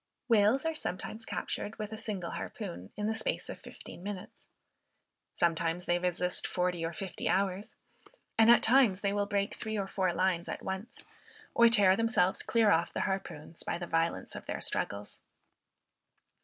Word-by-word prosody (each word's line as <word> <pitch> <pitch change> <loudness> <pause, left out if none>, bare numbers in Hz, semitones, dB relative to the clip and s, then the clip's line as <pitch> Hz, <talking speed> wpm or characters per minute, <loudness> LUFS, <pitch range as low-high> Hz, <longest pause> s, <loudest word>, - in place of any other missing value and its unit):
Whales 225 +4 +4
are 325 - +1
sometimes 220 - -4
captured, 210 - -3
with 215 0 -5
a - - -4
single 200 -5 -4
harpoon, 90 +3 -6
in 210 - -2
the 220 - +1
space - - -2
of - - -6
fifteen - - -11
minutes. 200 -1 -7 0.9
Sometimes 170 +1 +1
they 175 0 +2
resist 180 0 -1
forty 180 -2 -1
or 165 - -1
fifty 185 +2 -4
hours, 195 +1 0 0.6
and 225 0 +6
at 235 - +7
times 230 -6 +5
they 200 -1 +1
will 205 0 0
break 200 -1 0
three 220 -1 -4
or 200 - -1
four 190 -2 0
lines 175 -1 0
at - - -5
once, 190 +7 -5 0.5
or 235 - +7
tear 205 -5 +6
themselves 220 -4 +2
clear 225 -3 +3
off 165 +1 +2
the - - -2
harpoons, 165 -4 -4
by - - -2
the 175 - -5
violence 165 0 -1
of - - -8
their - - -3
struggles. 100 +1 -3
195 Hz, 170 wpm, -31 LUFS, 175-220 Hz, 0.9 s, at